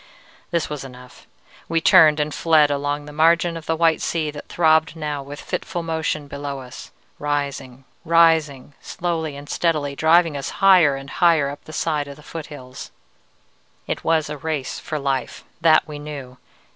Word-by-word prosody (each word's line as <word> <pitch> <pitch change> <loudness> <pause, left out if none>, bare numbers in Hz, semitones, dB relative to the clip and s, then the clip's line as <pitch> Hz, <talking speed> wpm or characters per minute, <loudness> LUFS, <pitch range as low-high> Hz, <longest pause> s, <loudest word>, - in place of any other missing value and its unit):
"This 170 -3 -1
was 150 -2 -6
enough: 125 -1 -13 0.4
we 165 - +2
turned 160 -5 +6
and 150 0 -1
fled 155 -3 +3
along 145 +1 -2
the 150 - -10
margin 165 +2 +3
of 165 -2 -8
the 165 - +1
white 165 -1 +2
sea 155 -3 -1
that 145 0 -10
throbbed 160 -1 +2
now 150 -3 -4
with 145 +1 -9
fitful 175 - -4
motion 160 -2 -2
below 140 -1 -5
us, 125 -1 -10 0.3
rising, 140 -3 -3 0.2
rising, 160 -5 +3
slowly 165 -4 -3
and 145 +1 -10
steadily, 150 -5 -1
driving 160 +1 +3
us 140 - -4
higher 185 -7 +5
and 135 0 -9
higher 165 -5 +4
up 145 - -11
the - - -10
side 150 -2 -1
of 140 - -9
the 150 - -17
foothills. 145 -6 -9 1.0
"It - - -4
was 160 -1 +1
a 150 -1 -6
race 150 -3 -3
for 155 - -4
life; 135 -3 -3 0.2
that 160 -1 +4
we 150 -1 -7
knew. 140 -4 -9
150 Hz, 170 wpm, -21 LUFS, 140-165 Hz, 1.0 s, turned